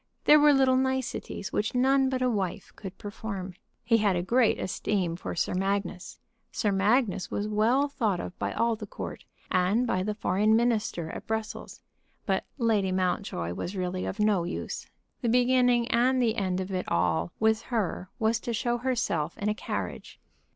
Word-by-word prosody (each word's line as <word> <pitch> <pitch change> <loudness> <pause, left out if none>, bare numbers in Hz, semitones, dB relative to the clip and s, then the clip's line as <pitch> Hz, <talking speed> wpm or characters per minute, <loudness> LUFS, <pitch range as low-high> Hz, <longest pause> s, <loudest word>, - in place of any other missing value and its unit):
There 300 - +8
were 295 0 +6
little 265 -2 +4
niceties 260 -6 -2
which 215 +4 -1
none 265 +1 +3
but 260 -1 -1
a 250 - +3
wife 195 -2 -3
could 190 -2 -9
perform. 200 -2 -6 0.3
He 230 0 +4
had 205 -4 +2
a 175 - -1
great 235 +4 +3
esteem 185 -2 -1
for 175 - -5
Sir 175 - 0
Magnus. 195 -1 -2 0.3
Sir 210 - 0
Magnus 200 0 +2
was 205 - -2
well 225 +7 +2
thought 225 -10 -1
of 180 - -6
by - - -1
all 230 0 +1
the 210 -1 -8
court, - - -7 0.3
and 185 +6 +2
by 185 -6 0
the 210 +2 -2
foreign 210 +1 +2
minister 220 -8 0
at - - -8
Brussels. 220 -1 -4 0.4
But - - 0
Lady 215 -6 +2
Mountjoy 180 - -1
was 180 - -5
really 185 0 -2
of 200 - -5
no 210 -4 +3
use. 175 - -5 0.3
The 235 - 0
beginning 245 0 +3
and 255 +2 +3
the 230 -3 +2
end 185 -3 -1
of 190 +1 -4
it 185 -1 -3
all 85 -1 +1
with 220 0 +3
her 195 -6 -2
was 225 0 +1
to 235 - -4
show 240 +2 0
herself 230 - -1
in 205 - -1
a - - +2
carriage. - - -5
210 Hz, 180 wpm, -28 LUFS, 185-240 Hz, 0.4 s, There